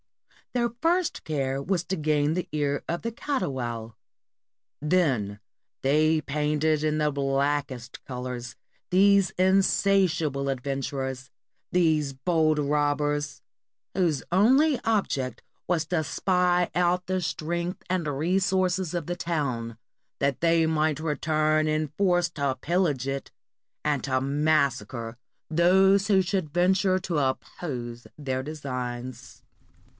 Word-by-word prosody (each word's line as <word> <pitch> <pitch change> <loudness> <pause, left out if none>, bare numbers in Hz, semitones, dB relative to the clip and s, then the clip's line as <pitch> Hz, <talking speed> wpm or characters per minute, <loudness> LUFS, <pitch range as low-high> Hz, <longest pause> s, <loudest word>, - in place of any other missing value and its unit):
Their 240 -1 +1
first 345 +1 +1
care 135 -3 -1
was 175 +3 0
to 190 - -2
gain 150 -2 +1
the 180 +1 -2
ear 145 -1 -1
of 170 +1 -2
the 230 - -2
Catoual; 125 - -3 0.9
then 135 - +1 0.4
they 155 +3 +3
painted 150 +1 0
in 155 0 +1
the 150 -1 +1
blackest 135 -2 -1
colors 125 -2 -6 0.3
these 200 +1 +5
insatiable 185 -6 +2
adventurers, 135 0 -3 0.4
these 155 -5 +2
bold 155 +2 +1
robbers, 145 0 0 0.5
whose 170 -7 +1
only 260 - +4
object 140 - -1 0.3
was 170 -3 +1
to 165 -1 0
spy 180 +2 +1
out 180 +1 +2
the 185 0 -1
strength 170 +2 -3
and 180 -3 0
re 155 +6 0
sources 185 -2 0
of 175 - -2
the 175 - -3
town, 130 -10 -2 0.4
that 140 -2 0
they 165 -1 +4
might 155 -1 +1
return 155 0 +1
in 155 -1 0
force 175 +1 +2
to 150 - -9
60s - - 0
PORTUGAL 130 -2 -1
pillage 155 -6 0
it, 135 0 -4 0.5
and 145 -3 +1
to 130 -1 +1
massacre 140 -4 0 0.3
those 190 +4 +4
who 195 -3 +4
should 180 -3 -1
venture 185 +3 +2
to 175 -4 -1
oppose 125 -3 -4
their 130 -3 -2
designs. 125 -4 -6
155 Hz, 120 wpm, -26 LUFS, 135-180 Hz, 0.9 s, these